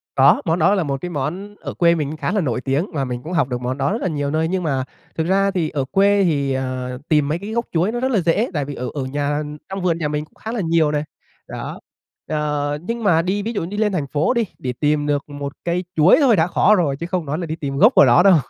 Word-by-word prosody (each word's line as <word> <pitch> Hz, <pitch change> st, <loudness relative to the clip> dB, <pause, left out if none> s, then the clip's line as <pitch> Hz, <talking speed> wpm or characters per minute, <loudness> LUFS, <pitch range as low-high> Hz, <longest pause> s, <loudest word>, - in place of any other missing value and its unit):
Có, -, -, +5 dB
món 165 Hz, +1 st, +1 dB
đó 185 Hz, +6 st, +4 dB
là 185 Hz, -, +1 dB
một 140 Hz, -2 st, -3 dB
cái 180 Hz, -, -4 dB
món 175 Hz, +8 st, -4 dB
ở -, -, -5 dB
quê 170 Hz, -1 st, +3 dB
mình 150 Hz, -3 st, -1 dB
cũng 155 Hz, -, -6 dB
khá 155 Hz, +3 st, -2 dB
là 210 Hz, -, +1 dB
nổi 130 Hz, -6 st, -1 dB
tiếng 140 Hz, +7 st, 0 dB
mà 140 Hz, -3 st, -1 dB
mình 125 Hz, -1 st, -5 dB
cũng 170 Hz, +4 st, -6 dB
học 165 Hz, -6 st, +2 dB
được, 125 Hz, 0 st, -3 dB
món 125 Hz, +2 st, -2 dB
đó 140 Hz, +5 st, 0 dB
rất 225 Hz, -, -2 dB
là -, -, 0 dB
nhiều 145 Hz, -3 st, -2 dB
nơi. 160 Hz, +1 st, +1 dB
Nhưng 185 Hz, +1 st, -1 dB
mà 135 Hz, -5 st, 0 dB, 0.3 s
thực 160 Hz, 0 st, 0 dB
ra 195 Hz, +1 st, +2 dB
thì 175 Hz, -5 st, -1 dB
ở 135 Hz, -3 st, -2 dB
quê 200 Hz, 0 st, +4 dB
thì, 140 Hz, -5 st, +1 dB
ờ, 130 Hz, -1 st, -3 dB
tìm 150 Hz, -2 st, +3 dB
mấy 155 Hz, +4 st, -1 dB
cái 200 Hz, +3 st, -7 dB
gốc 235 Hz, +1 st, -1 dB
chuối 175 Hz, +5 st, +1 dB
nó 240 Hz, -, -3 dB
rất 260 Hz, +1 st, 0 dB
là 215 Hz, -, +3 dB
dễ, 180 Hz, +8 st, +1 dB
tại 145 Hz, -4 st, -1 dB
vì 145 Hz, 0 st, -6 dB
ở 125 Hz, -, -4 dB
ở 140 Hz, -, -3 dB
nhà 145 Hz, +2 st, -1 dB, 0.3 s
trong 195 Hz, 0 st, -4 dB
vườn 170 Hz, -2 st, +1 dB
nhà 160 Hz, -3 st, -1 dB
mình 150 Hz, 0 st, -2 dB
cũng -, -, -32 dB
khá 220 Hz, -, -6 dB
là 230 Hz, -3 st, -2 dB
nhiều 165 Hz, -2 st, +2 dB
này, 150 Hz, 0 st, 0 dB, 0.4 s
đó. -, -, -6 dB, 0.5 s
Ờ, 150 Hz, -1 st, -1 dB
nhưng 230 Hz, +5 st, -4 dB
mà 165 Hz, -5 st, +4 dB
đi 195 Hz, +3 st, -1 dB
ví 230 Hz, -, -3 dB
dụ 200 Hz, -, -2 dB
đi 200 Hz, +4 st, -6 dB
lên 210 Hz, -1 st, +2 dB
thành 145 Hz, -6 st, -1 dB
phố 155 Hz, -, +1 dB
đi 235 Hz, -2 st, +1 dB
để 125 Hz, -1 st, -3 dB
tìm 150 Hz, 0 st, +1 dB
được 145 Hz, 0 st, -1 dB
một 145 Hz, -1 st, -6 dB
cây 175 Hz, +1 st, 0 dB
chuối 155 Hz, +3 st, +6 dB
thôi 255 Hz, -7 st, +5 dB
đã 165 Hz, 0 st, +2 dB
khó 210 Hz, +4 st, +4 dB
rồi 155 Hz, -8 st, +1 dB
chứ 170 Hz, -, -3 dB
không 175 Hz, -2 st, -2 dB
nói 150 Hz, +2 st, -2 dB
là 175 Hz, -, -3 dB
đi 160 Hz, 0 st, -4 dB
tìm 140 Hz, -3 st, -4 dB
gốc 215 Hz, -, +6 dB
của -, -, +8 dB
nó 175 Hz, -, +5 dB
đâu. 195 Hz, -3 st, +7 dB
160 Hz, 290 wpm, -20 LUFS, 145-190 Hz, 0.5 s, của